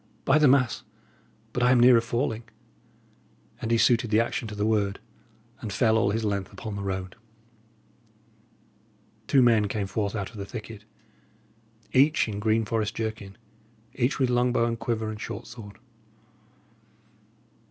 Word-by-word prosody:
"By 140 Hz, +3 st, +4 dB
the 150 Hz, -, +5 dB
mass, 130 Hz, -2 st, +3 dB, 0.7 s
but 125 Hz, -, -1 dB
I 125 Hz, -, +4 dB
am 130 Hz, -, +5 dB
nearer 120 Hz, -1 st, +7 dB
falling." 115 Hz, -1 st, -2 dB, 1.2 s
And 115 Hz, -, -3 dB
he 115 Hz, -, +3 dB
suited 115 Hz, 0 st, +3 dB
the 105 Hz, +1 st, +3 dB
action 115 Hz, 0 st, -1 dB
to 105 Hz, -, -7 dB
the 105 Hz, 0 st, -1 dB
word, 105 Hz, -2 st, 0 dB, 0.6 s
and 110 Hz, -, -6 dB
fell 110 Hz, +2 st, +2 dB
all 110 Hz, -3 st, +2 dB
his 110 Hz, +2 st, -1 dB
length 100 Hz, -2 st, -2 dB
upon 110 Hz, -3 st, -7 dB
the 100 Hz, -, -4 dB
road. 95 Hz, -1 st, -4 dB, 2.1 s
Two 135 Hz, -2 st, +4 dB
men 110 Hz, -4 st, +4 dB
came 100 Hz, 0 st, -2 dB
forth 100 Hz, +1 st, -2 dB
out 100 Hz, -3 st, -4 dB
of 115 Hz, -, -13 dB
the 100 Hz, -, -5 dB
thicket, 110 Hz, -2 st, -9 dB, 1.1 s
each 140 Hz, +2 st, +4 dB
in 105 Hz, -2 st, -4 dB
green 110 Hz, +1 st, +1 dB
forest 110 Hz, -1 st, -2 dB
jerkin, 110 Hz, -3 st, -5 dB, 0.6 s
each 130 Hz, +1 st, 0 dB
with 130 Hz, -3 st, +1 dB
long 125 Hz, 0 st, +2 dB
bow 115 Hz, -1 st, +2 dB
and 115 Hz, -1 st, -2 dB
quiver 115 Hz, -2 st, -2 dB
and 110 Hz, 0 st, -8 dB
short 115 Hz, -, -6 dB
sword. 110 Hz, -3 st, -11 dB
110 Hz, 155 wpm, -26 LUFS, 105-120 Hz, 2.1 s, nearer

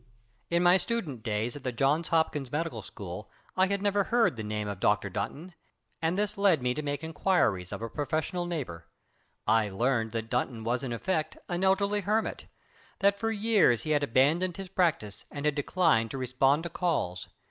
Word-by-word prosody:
In 170 Hz, +1 st, +2 dB
my 175 Hz, +1 st, +6 dB
student 180 Hz, -, -3 dB
days 110 Hz, +2 st, -2 dB
at 145 Hz, -, -9 dB
the 130 Hz, -, -1 dB
Johns 140 Hz, +7 st, +1 dB
Hopkins 150 Hz, -5 st, 0 dB
Medical 150 Hz, -7 st, -2 dB
School 95 Hz, 0 st, -8 dB, 0.3 s
I 185 Hz, 0 st, +4 dB
had 200 Hz, +1 st, -1 dB
never 200 Hz, -1 st, +2 dB
heard 235 Hz, -, +2 dB
the 110 Hz, -, -5 dB
name 105 Hz, 0 st, -3 dB
of 100 Hz, -2 st, -5 dB
Dr. -, -, +1 dB
Dunton, 175 Hz, +5 st, -4 dB, 0.5 s
and 165 Hz, +3 st, 0 dB
this 210 Hz, 0 st, -1 dB
led 195 Hz, -6 st, +4 dB
me 125 Hz, 0 st, +1 dB
to 150 Hz, -, -3 dB
make 145 Hz, 0 st, -3 dB
inquiries 160 Hz, -, +1 dB
of -, -, -5 dB
a -, -, -2 dB
professional 155 Hz, +6 st, -2 dB
neighbor. 120 Hz, -, -5 dB, 0.6 s
I 110 Hz, -1 st, +3 dB
learned 115 Hz, +2 st, 0 dB
that 115 Hz, 0 st, -4 dB
Dunton 120 Hz, -2 st, -1 dB
was 120 Hz, +2 st, 0 dB
in 130 Hz, -, -4 dB
effect 155 Hz, +7 st, -2 dB
an 175 Hz, +1 st, -2 dB
elderly 200 Hz, +2 st, +2 dB
hermit, 215 Hz, +3 st, -1 dB, 0.5 s
that 200 Hz, 0 st, +2 dB
for 225 Hz, -, 0 dB
years 210 Hz, -, +3 dB
he 155 Hz, -, -2 dB
had 145 Hz, -1 st, +3 dB
abandoned 150 Hz, -, +2 dB
his 195 Hz, -1 st, -7 dB
practice 165 Hz, -, 0 dB
and 145 Hz, 0 st, -6 dB
had 150 Hz, -, +3 dB
declined 145 Hz, -5 st, +2 dB
to 135 Hz, -, -5 dB
respond 135 Hz, +4 st, +2 dB
to 170 Hz, -, -4 dB
calls. 145 Hz, -, -1 dB
150 Hz, 190 wpm, -29 LUFS, 115-185 Hz, 0.6 s, my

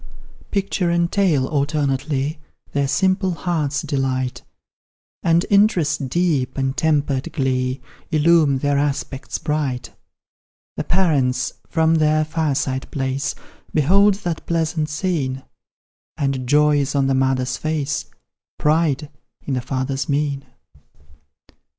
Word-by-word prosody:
Picture 195 Hz, -3 st, 0 dB
and 170 Hz, 0 st, +1 dB
tale 170 Hz, -10 st, +2 dB
alternately 145 Hz, 0 st, -1 dB, 0.3 s
Their 140 Hz, -1 st, +1 dB
simple 185 Hz, +5 st, +1 dB
hearts 150 Hz, -3 st, -1 dB
delight, 130 Hz, -4 st, -1 dB, 0.8 s
And 170 Hz, +1 st, +3 dB
interest 170 Hz, -9 st, +3 dB
deep, 155 Hz, -5 st, 0 dB
and 135 Hz, 0 st, 0 dB
tempered 145 Hz, -4 st, 0 dB
glee, 130 Hz, -1 st, -1 dB, 0.3 s
Illume 155 Hz, -2 st, +4 dB
their 145 Hz, +1 st, +1 dB
aspects 140 Hz, -1 st, -2 dB
bright. 150 Hz, -5 st, -2 dB, 0.8 s
The -, -, -2 dB
parents, 140 Hz, -9 st, +1 dB, 0.2 s
from 160 Hz, 0 st, +3 dB
their 155 Hz, -1 st, +3 dB
fireside 145 Hz, -4 st, -1 dB
place, 135 Hz, +1 st, -2 dB, 0.4 s
Behold 195 Hz, +7 st, +5 dB
that 170 Hz, -2 st, -3 dB
pleasant 160 Hz, -2 st, 0 dB
scene, 150 Hz, -6 st, -2 dB, 0.7 s
And 135 Hz, -3 st, -1 dB
joy 150 Hz, 0 st, +4 dB
is 140 Hz, +1 st, -1 dB
on 140 Hz, -1 st, +3 dB
the 135 Hz, -, +2 dB
mother's 130 Hz, -1 st, +1 dB
face, 155 Hz, -1 st, -2 dB, 0.5 s
Pride 150 Hz, -1 st, +1 dB, 0.4 s
in 140 Hz, -, -2 dB
the 125 Hz, -, 0 dB
father's 130 Hz, +1 st, -2 dB
mien. 140 Hz, -1 st, 0 dB
145 Hz, 110 wpm, -21 LUFS, 135-160 Hz, 0.8 s, Behold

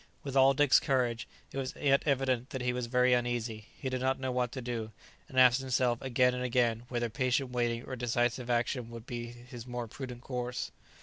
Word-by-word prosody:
With 140 Hz, -1 st, -5 dB
all 135 Hz, 0 st, +6 dB
Dick's 145 Hz, -1 st, +6 dB
courage, 125 Hz, -3 st, 0 dB, 0.2 s
it 135 Hz, -, -4 dB
was 130 Hz, -1 st, -4 dB
yet 140 Hz, -1 st, +4 dB
evident 130 Hz, -3 st, +1 dB
that 130 Hz, -2 st, -4 dB
he 125 Hz, 0 st, +1 dB
was 125 Hz, -1 st, -2 dB
very 125 Hz, +1 st, +4 dB
uneasy; 120 Hz, -3 st, -1 dB
he 135 Hz, -, -5 dB
did 130 Hz, -1 st, -2 dB
not 130 Hz, +1 st, +1 dB
know 130 Hz, -1 st, -2 dB
what 125 Hz, -1 st, 0 dB
to -, -, -4 dB
do, 120 Hz, -3 st, -4 dB, 0.4 s
and 130 Hz, -, +1 dB
asked 125 Hz, +1 st, +6 dB
himself 125 Hz, -2 st, +1 dB
again 125 Hz, -1 st, +3 dB
and 125 Hz, 0 st, -3 dB
again 120 Hz, -2 st, +1 dB
whether 120 Hz, -1 st, -1 dB
patient 130 Hz, +3 st, 0 dB
waiting 120 Hz, -1 st, 0 dB
or 130 Hz, -, -5 dB
decisive 120 Hz, 0 st, 0 dB
action 120 Hz, 0 st, 0 dB
would 115 Hz, -1 st, -9 dB
be 120 Hz, -1 st, -5 dB
his 120 Hz, 0 st, -10 dB
more 120 Hz, -1 st, -4 dB
prudent 125 Hz, +1 st, -7 dB
course. 125 Hz, -1 st, -3 dB
125 Hz, 205 wpm, -31 LUFS, 120-130 Hz, 0.4 s, all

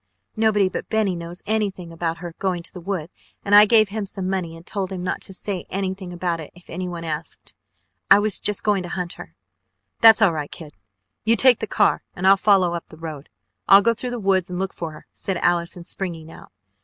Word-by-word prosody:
Nobody 215 Hz, -3 st, +3 dB
but 185 Hz, -, -5 dB
Benny 215 Hz, -4 st, +1 dB
knows 170 Hz, +1 st, -8 dB
anything 200 Hz, -5 st, -2 dB
about 165 Hz, 0 st, -3 dB
her 175 Hz, -1 st, -8 dB
going 180 Hz, -3 st, -1 dB
to -, -, -9 dB
the 180 Hz, -, -9 dB
woods 180 Hz, -2 st, -4 dB, 0.3 s
and 200 Hz, -, 0 dB
I 210 Hz, +1 st, +10 dB
gave 215 Hz, -2 st, +5 dB
him 210 Hz, -1 st, -4 dB
some 190 Hz, -1 st, -3 dB
money 180 Hz, -4 st, -3 dB
and 165 Hz, -, -15 dB
told 195 Hz, -2 st, -4 dB
him 185 Hz, -2 st, -5 dB
not 180 Hz, -, -2 dB
to -, -, -5 dB
say 190 Hz, -1 st, -5 dB
anything 190 Hz, -1 st, -4 dB
about 175 Hz, -1 st, -2 dB
it 155 Hz, -, -8 dB
if 175 Hz, -, -15 dB
anyone 175 Hz, -1 st, -5 dB
asked. 160 Hz, 0 st, -4 dB, 0.6 s
I -, -, +9 dB
was 205 Hz, -1 st, +1 dB
just 210 Hz, -, -1 dB
going 205 Hz, -3 st, +2 dB
to 175 Hz, -, -7 dB
hunt 180 Hz, -1 st, -4 dB
her 80 Hz, -, -12 dB, 0.3 s
" 95 Hz, +1 st, -48 dB
"That's 225 Hz, -1 st, +9 dB
all 205 Hz, -6 st, +4 dB
right, 150 Hz, -2 st, -4 dB
kid! 155 Hz, -4 st, -10 dB, 0.5 s
You 225 Hz, +1 st, +3 dB
take 250 Hz, +1 st, +5 dB
the 220 Hz, -, -4 dB
car -, -, +2 dB
and 180 Hz, -, -4 dB
follow 190 Hz, -4 st, +3 dB
up 170 Hz, -, -6 dB
the 160 Hz, -, -13 dB
road. 155 Hz, -3 st, -8 dB, 0.4 s
I'll 200 Hz, +1 st, +8 dB
go 230 Hz, -, +3 dB
through 245 Hz, +2 st, -4 dB
the 245 Hz, -1 st, -4 dB
woods 190 Hz, -3 st, +1 dB
and 180 Hz, -, -4 dB
look 190 Hz, +1 st, -3 dB
for 165 Hz, -, -5 dB
her 155 Hz, -, -13 dB
!" -, -, -54 dB
said 190 Hz, -2 st, -1 dB
Allison, 175 Hz, 0 st, 0 dB
springing 165 Hz, -4 st, -5 dB
out. -, -, -14 dB
185 Hz, 230 wpm, -22 LUFS, 170-200 Hz, 0.6 s, I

